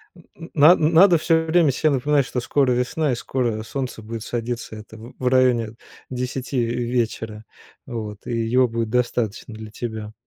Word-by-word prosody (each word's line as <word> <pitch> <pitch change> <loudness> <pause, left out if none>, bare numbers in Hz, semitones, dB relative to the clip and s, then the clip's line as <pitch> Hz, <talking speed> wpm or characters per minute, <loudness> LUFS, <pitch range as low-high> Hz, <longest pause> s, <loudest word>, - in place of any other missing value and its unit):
Н 175 - -16
н 165 - -11
на 155 +4 +7
надо 170 +3 +5
все 160 0 +2
время 160 -2 +3
се 155 +4 +1
напоминать, 140 0 +2
что 125 - -3
скоро 130 +2 +1
весна 125 +5 0
и - - 0
скоро 120 -3 -2
солнце 125 -1 -5
будет 110 0 -6
садиться. 120 -1 -4
Это 110 +1 -11
в 115 +3 -12
в 130 - -1
районе 125 -3 +2 0.3
10 125 0 -2
в - - -3 0.2
вечера. 110 -3 -2 0.4
Вот, 105 -3 -7
и - - -5
его 120 +3 +2
будет 115 -1 -3
достаточно 120 -2 -1
для 110 0 -9
тебя. 110 -1 -6
125 Hz, 175 wpm, -22 LUFS, 115-140 Hz, 0.4 s, на